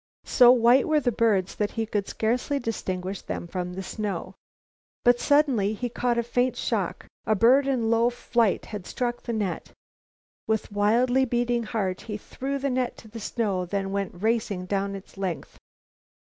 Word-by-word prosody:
So 245 -1 +7
white 245 +1 +5
were 310 -1 +3
the 250 -4 +1
birds 210 -5 +1
that 210 -1 -1
he 225 -1 -1
could 205 -2 -2
scarcely 245 +6 0
distinguish 190 -6 -3
them - - -5
from 180 +1 -4
the 190 +1 -5
snow. 195 -3 -4 0.7
But, 245 0 +5
suddenly, 270 -9 +3
he 245 +3 -3
caught 240 0 0
a 235 - +2
faint 245 +1 0
shock. - - -2 0.2
A 215 - +3
bird 255 +6 +5
in 240 -5 +1
low 230 +1 +4
flight 235 -3 0
had 205 -4 -7
struck 240 -1 -2
the 235 - -4
net. 205 -4 -3 0.8
With 220 -1 -1
wildly 240 +6 +3
beating 240 0 0
heart, 200 -5 -2
he 210 -2 -5
threw 270 +6 -4
the 275 0 -1
net 250 -1 -1
to 220 - -13
the 230 +2 -8
snow, 205 -4 -1
then 195 +1 -2
went 195 -2 -4
racing 215 -5 0
down 200 +1 -1
its 195 0 -11
length. 185 -4 -4
225 Hz, 175 wpm, -26 LUFS, 200-245 Hz, 0.8 s, So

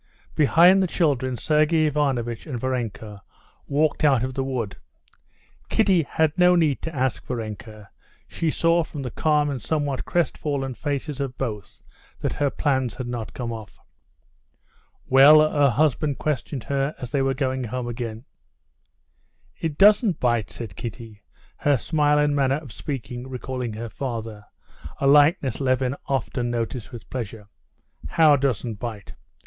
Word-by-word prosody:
Behind 175 +6 +5
the 190 - +2
children 135 -7 0
Sergey 155 +2 +2
Ivanovitch 135 -6 -1
and 130 -5 -4
Varenka 110 -5 -4 0.5
walked 150 +2 +1
out 135 -5 +4
of 130 0 -3
the 135 - -2
wood. 120 -7 -3 0.9
Kitty 195 -6 +3
had 160 0 0
no 180 0 +5
need 155 -6 +2
to 160 -1 -6
ask 130 -3 -1
Varenka; 110 -3 -7 0.4
she 165 - -2
saw 165 +2 +2
from 145 -3 -7
the 125 - -5
calm 150 -1 +1
and 130 -4 -4
somewhat 145 -2 -1
crestfallen 145 -6 -1
faces 145 +1 -4
of 135 -2 -4
both 105 -6 -5 0.4
that - - -2
her 145 -1 0
plans 130 -4 -1
had 130 - -5
not 120 -3 -5
come 120 -2 -4
off. 110 -2 -10 1.3
"Well?" 150 +4 +7
her 145 -2 +3
husband 145 +2 +1
questioned 145 -3 -3
her 140 +1 -1
as 125 -2 -7
they 140 - +1
were 135 0 +1
going 130 -1 -1
home 125 +2 -4
again. 115 0 -5 1.3
"It 155 -3 -3
doesn't 205 - +5
bite," 120 -5 +1
said 110 -8 -8
Kitty, 115 -3 -8 0.4
her 145 -2 +2
smile 150 +2 +1
and 150 0 +2
manner 135 -1 +2
of 145 -6 -10
speaking 125 -1 -6
recalling 125 -2 -4
her 115 +2 -6
father, 115 -4 -5 0.5
a - - -2
likeness 145 - +4
Levin 130 0 +1
often 125 -2 -1
noticed 120 0 -3
with 115 -6 -10
pleasure. 110 -4 -6 0.6
"How 155 -3 +5
doesn't 125 -5 -1
bite?" 110 -5 -6
135 Hz, 145 wpm, -24 LUFS, 120-150 Hz, 1.3 s, Well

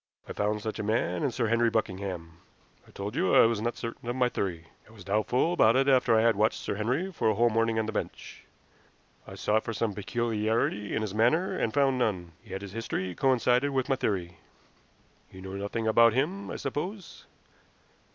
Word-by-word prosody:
I - - -6
found 105 0 -1
such 110 -1 -4
a - - -2
man 105 -5 0
in - - +1
Sir 120 -1 -1
Henry 115 +1 +2
Buckingham. 95 -6 -3 0.5
I - - -19
told 100 +4 -6
you 175 +4 +2
I - - +8
was 115 -2 +1
not 120 +1 -2
certain 115 0 -6
of 120 - -2
my 125 -1 +2
theory. 85 -7 -3 0.2
I - - -17
was 105 -5 -13
doubtful 110 - +1
about 115 -9 +4
it 135 +1 +3
after 125 -4 +4
I 110 - +3
had 115 -1 +4
watched 105 +2 +2
Sir - - -3
Henry 125 - -1
for 155 - 0
a 110 - +1
whole 120 +2 +3
morning 115 0 +1
on 110 - +1
the 110 - -3
bench. 110 - -6 0.8
I 95 - -9
sought 105 +3 +1
for 115 - -4
some 110 0 -1
peculiarity 110 -1 -1
in 110 - -1
his 105 -3 -4
manner, 125 - +2
and 110 - -1
found 135 -1 +2
none. 95 -8 -1
Yet 95 +1 -7
his 100 - -8
history 95 -4 -3
coincided 130 +2 +2
with 130 +1 -1
my 135 - +3
theory. 90 -8 -3 0.9
You 95 - -12
know 95 0 -8
nothing 100 +3 -3
about 115 +1 +5
him, 175 - -1
I - - -5
suppose?" 175 +8 -5
110 Hz, 205 wpm, -28 LUFS, 100-125 Hz, 0.9 s, I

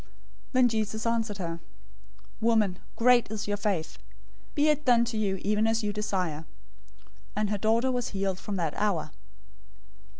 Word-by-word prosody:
015:028 - - -25 0.5
Then 255 -1 +5
Jesus 220 -1 -2
answered 225 -3 0
her, 170 -3 -4 0.8
"Woman, 220 -5 +2 0.2
great 245 -1 +4
is 215 -1 -4
your 205 - 0
faith! 200 -6 -2 0.6
Be 295 +1 +3
it 300 0 +2
done 240 -4 +4
to 235 -1 -4
you 200 -3 0
even 210 +2 +2
as 225 0 +1
you 205 0 -1
desire." 185 -7 -2 0.9
And 210 0 0
her 205 - -1
daughter 230 +5 +2
was 245 -2 -1
healed 195 -2 -2
from 205 - -4
that 165 -5 -1
hour. 195 -7 0
210 Hz, 160 wpm, -28 LUFS, 195-230 Hz, 0.9 s, Then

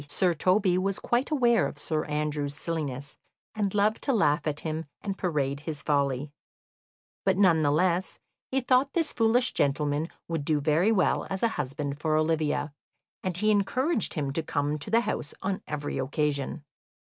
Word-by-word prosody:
Sir 175 +4 +1
Toby 185 +2 +2
was 195 +1 -1
quite 240 +3 0
aware 240 -7 +3
of - - -8
Sir 155 +1 -2
Andrew's 150 -1 -2
silliness, 145 -4 -4 0.3
and 205 -2 -1
loved 210 +2 +2
to 275 - 0
laugh 150 -8 +2
at 150 -1 -2
him 160 0 -3 0.2
and 200 -2 -2
parade 145 -7 -1
his 150 -1 -5
folly; 140 -1 0 0.9
but - - +2
none 180 -5 +5
the 145 - +3
less 175 +4 +1 0.3
he 265 0 0
thought 255 +2 +2
this 330 -3 0
foolish 240 +2 +2
gentleman 145 +3 0 0.2
would 165 -3 -2
do 150 0 +1
very 155 +8 +3
well 200 -5 +2
as 190 +2 -3
a 230 - +4
husband 145 -4 -3
for 155 0 +1
Olivia, 155 -2 0 0.5
and 185 -2 -3
he 215 +3 +2
encouraged 220 - +1
him 140 -4 -2
to 165 - 0
come 150 -1 -1
to 145 - -6
the 230 +2 +4
house 145 - -3
on 190 0 -1
every 145 -1 -3
occasion. 145 +1 -1
160 Hz, 170 wpm, -28 LUFS, 145-200 Hz, 0.9 s, none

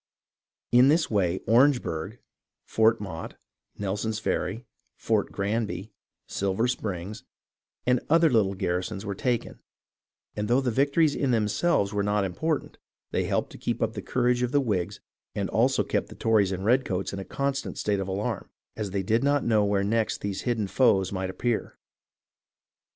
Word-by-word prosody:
In 125 +2 +7
this 155 0 +3
way 95 -4 +1
Orange 125 +4 +4
burgh, 85 +6 -4 0.5
Fort 110 +1 +3
Motte, 90 -5 -6 0.4
Nelson's 105 +2 -2
Ferry, 110 +2 -2 0.3
Fort - - 0
Granby, 105 0 -2 0.3
Silver 100 +4 0
Springs, 100 -3 -4 0.6
and 125 0 +3
other 165 +1 +5
little 105 -8 +2
garrisons 90 +2 -2
were 100 - -2
taken, 120 +4 -2 0.8
and 105 0 -2
though 120 +3 +4
the 130 -3 0
victories 140 +5 +3
in 140 - 0
themselves 110 0 +1
were 105 - +1
not 105 0 +1
important, 145 - -2 0.3
they - - 0
helped - - -1
to - - -11
keep 120 - -2
up 110 0 0
the 105 - -5
courage 125 +3 +1
of 125 -1 0
the 145 - +3
Whigs 105 -10 -2 0.3
and - - -2
also - - +3
kept - - -1
the - - -10
Tories 105 -4 +2
and 95 +1 -3
redcoats 110 -6 +1
in 100 - -4
a - - -4
constant 140 +5 -3
state 100 -2 0
of 95 - -3
alarm, 100 +3 -3 0.3
as 105 -2 -3
they 95 0 -2
did 110 +6 +1
not 145 0 +2
know 110 -3 +3
where 100 -1 +1
next 110 +2 0
these 100 -1 -3
hidden 115 -3 0
foes 95 -4 +3
might 95 -1 -2
ap 95 - -8
pear. 120 -3 -1
110 Hz, 165 wpm, -27 LUFS, 95-125 Hz, 0.8 s, In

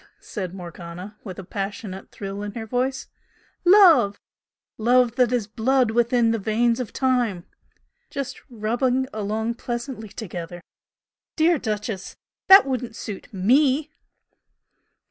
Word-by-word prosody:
said 185 -5 -5
Morgana, 180 +2 -9
with 185 -5 -8
a 195 - -7
passionate 195 +1 -6
thrill 195 0 -6
in 205 -1 -5
her 225 -2 -5
voice 255 +4 -1 0.6
"Love! 350 - +6 0.6
'Love 240 +1 +3
that 250 -2 +3
is 245 -4 0
blood 240 +3 +1
within 235 0 +3
the 225 - 0
veins 230 +3 +1
of 250 - -4
time!' 245 -9 0 0.6
Just 275 -2 -5
'rubbing 245 +3 0
along 220 +2 -2
pleasantly 235 -1 -5
together!' 175 -5 -7 0.7
Dear 325 0 +3
'Duchess,' 210 -3 -4 0.3
that 385 +1 +9
wouldn't 250 -4 -3
suit 210 +2 -7
ME!" 265 +9 +2
230 Hz, 120 wpm, -23 LUFS, 200-255 Hz, 0.7 s, that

